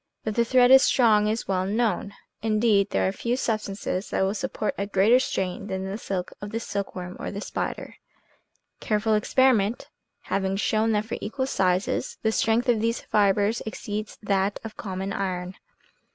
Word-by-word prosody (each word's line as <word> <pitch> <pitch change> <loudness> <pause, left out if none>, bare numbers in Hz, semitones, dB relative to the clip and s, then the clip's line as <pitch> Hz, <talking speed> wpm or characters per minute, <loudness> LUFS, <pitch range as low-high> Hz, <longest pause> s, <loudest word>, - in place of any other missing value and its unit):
That 215 - -2
the 235 - +3
thread 250 +1 +4
is 265 0 +9
strong 215 -6 +4
is 220 +2 -2
well 185 -1 0
known. 205 -2 -1 0.3
Indeed, 215 -2 +2
there 95 -1 +1
are - - +1
few 240 - -2
substances 205 -5 -2
that - - 0
will 190 +1 +1
support 220 -2 -2
a 200 - -3
greater 205 +5 +4
strain 190 -5 -2
than 190 -1 -3
the 190 +1 -4
silk 190 -4 -4
of 205 - -5
the 225 +2 -3
silkworm, 190 -4 -5
or - - -4
the 200 - -5
spider; - - -5 0.8
careful 215 +1 0
experiment 225 0 +2 0.3
having 190 0 -1
shown 220 +2 +1
that 210 0 0
for 225 - -5
equal 260 +5 -2
sizes 185 -6 0
the 220 - +2
strength 225 +3 +1
of 235 -3 +3
these 230 +1 0
fibers 205 +2 +2
exceeds 215 0 -5
that 200 0 0
of 225 -1 -8
common 190 0 -4
iron. 180 -2 -3
210 Hz, 170 wpm, -25 LUFS, 195-225 Hz, 0.8 s, is